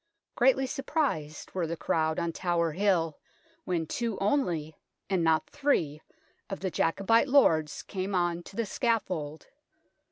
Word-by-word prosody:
Greatly 265 +2 +3
surprised 270 - -2
were 180 -3 -1
the 170 +1 -4
crowd 160 0 0
on 170 0 -1
Tower 170 -2 0
Hill 170 -3 +1 0.5
when 170 -3 -1
two 230 +4 -2
only, 175 - 0 0.4
and 185 -3 +2
not 160 -1 +2
three, 175 - 0 0.5
of 195 - -4
the 190 -1 -2
Jacobite 195 +11 +2
lords 160 - +3
came 190 0 -3
on 175 -1 +1
to 195 - -13
the 230 - 0
scaffold. 185 - -1
180 Hz, 135 wpm, -29 LUFS, 160-230 Hz, 0.5 s, Greatly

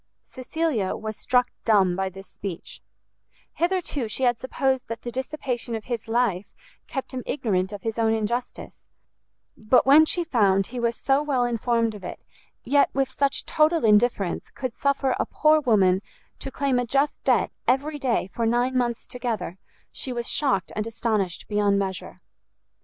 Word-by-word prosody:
Cecilia 260 - -2
was 215 0 -5
struck 250 +2 +1
dumb 195 -5 +3
by 190 0 -1
this 195 +1 -12
speech: 185 -4 -8 0.7
hitherto 345 -8 -1
she 220 +5 -3
had 240 -2 +2
supposed 260 0 -1
that 230 0 -6
the 240 - -4
dissipation 255 -3 -3
of 220 - -5
his 235 -3 -4
life 225 -5 0 0.3
kept 270 - -5
him 255 -1 -4
ignorant 190 -8 0
of 205 -2 -8
his 225 0 -3
own 225 -1 +3
injustice; 225 +3 -3 0.7
but 220 +4 +3
when 300 +4 +7
she 350 - 0
found 200 - +2
he 245 +4 -6
was 235 0 0
so 270 +4 +1
well 275 -5 +1
informed 230 -1 0
of 205 -3 -10
it, - - -6 0.4
yet, 285 0 +3
with 270 -1 +1
such 275 +1 0
total 310 -1 +2
indifference, 210 -3 +2
could 255 -3 -4
suffer 275 -1 0
a - - +1
poor 310 0 +4
woman 195 -8 +3 0.4
to - - -5
claim 270 -2 0
a 245 - 0
just 275 +4 0
debt - - +2 0.2
every 290 +4 +1
day 250 -8 +1
for 230 -1 0
nine 245 +3 +1
months 240 -2 0
together, 225 -7 -4 0.3
she 260 - -5
was 240 -1 -3
shocked 260 - 0
and 215 +1 -2
astonished 215 -5 -1
beyond 205 -1 +2
measure. 190 -1 -4
240 Hz, 165 wpm, -25 LUFS, 210-270 Hz, 0.7 s, when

